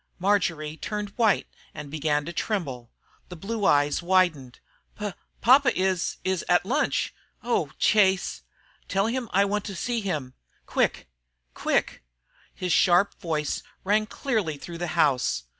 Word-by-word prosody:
Marjory 170 -5 0
turned 210 +4 -4
white 220 -2 +2 0.3
and 145 -1 -8
began 150 -1 0
to 170 - -6
tremble. 140 - -3 0.4
The 180 - -7
blue 205 +5 -3
eyes 145 0 +3
widened. 170 -8 +1 0.4
"P 210 -1 -3 0.3
papa 255 -2 +5
is 185 -2 0
is 185 -2 -1
at 175 0 +4
lunch. 280 +9 0 0.3
Oh 235 - 0
Chase!" 195 -3 +3 0.5
"Tell 195 +1 +1
him 240 0 -2
I 200 +2 +4
want 205 0 -1
to 200 - -5
see 235 +5 -2
him 150 -10 -3 0.3
quick - - 0 0.5
quick!" - - -1 0.5
His 180 -1 -3
sharp 180 +2 +3
voice 155 -3 -2 0.2
rang 215 +2 +2
clearly 215 - -2
through 170 +3 -8
the 175 - -2
house. 135 - +2
185 Hz, 140 wpm, -26 LUFS, 155-210 Hz, 0.5 s, papa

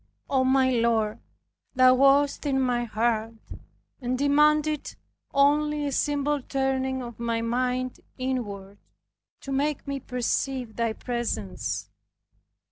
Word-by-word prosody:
O 265 -1 +3
my 260 0 +3
Lord, 230 -3 +1 0.6
Thou 255 0 +7
wast 275 +2 +3
in 270 -1 +1
my 245 -2 +1
heart, 225 0 -1 0.7
and 250 0 -1
demanded 300 +2 +2 0.4
only 295 +1 +2
a 285 - -1
simple 290 +1 0
turning 265 -1 -1
of 240 -1 -9
my 230 -1 -1
mind 250 +2 -1 0.2
inward, 205 -7 -4 0.6
to 275 - -7
make 285 +2 -1
me 280 0 -2
perceive 250 -1 -2
Thy 230 -1 0
presence. 105 - -4
255 Hz, 115 wpm, -26 LUFS, 235-280 Hz, 0.7 s, Thou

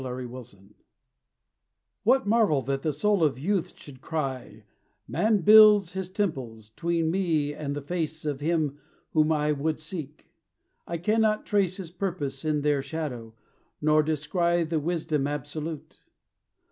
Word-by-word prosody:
ARARAT 125 -2 -7 1.5
What 260 +5 +3
marvel 205 - +3
that 135 +2 -2
the 155 - 0
soul 195 +5 +1
of 145 -5 +2
youth 180 +6 -2
should 130 -3 -13
cry, 130 -9 -4 0.4
"Man 215 -2 +1
builds 210 -2 +7
his 190 -1 -5
temples 130 - -3
'tween 165 +5 -1
me 160 -6 0
and 145 -1 -4
the 145 - -5
face 160 0 -4
Of 145 -3 -2
Him 150 -2 -1 0.3
whom 155 0 +3
I 150 -1 +1
would 150 +2 -1
seek; 155 -2 -8 0.6
I 170 - -3
cannot 215 +4 +1
trace 195 -3 +1
His 180 -4 -8
purpose 170 -8 -4
in 155 -2 0
their 145 -1 +1
shadow, 125 -8 -6 0.4
nor 155 0 +4
descry 170 +3 0
The 160 0 -1
wisdom 155 -3 -1
absolute?" 150 +2 -6
155 Hz, 135 wpm, -27 LUFS, 145-180 Hz, 1.5 s, builds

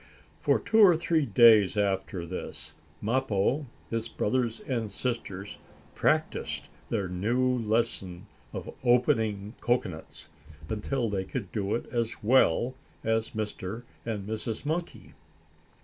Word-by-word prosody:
For - - +3
two 225 - +1
or 190 -5 +8
three 160 -3 +1
days 110 -5 +6
after 95 -3 0
this, 90 +2 -7 0.3
Mappo, 130 +3 +1 0.2
his 115 0 -1
brothers 115 0 0
and 115 -5 -2
sisters 105 -6 -4 0.3
practiced - - 0 0.2
their 100 - 0
new 120 +8 +1
lesson 105 -5 -1 0.3
of - - -6
opening 115 -5 +2
cocoanuts, 95 -10 -2 0.4
until 115 +3 -1
they 100 -3 -1
could 100 -1 -5
do 100 -2 -1
it 120 - -3
as 115 -2 -2
well 120 0 +4 0.3
as 115 0 0
Mr. 110 +1 -4 0.2
and 105 -4 -4
Mrs. 110 +3 -4
Monkey. 170 +3 -3
115 Hz, 115 wpm, -28 LUFS, 100-125 Hz, 0.4 s, or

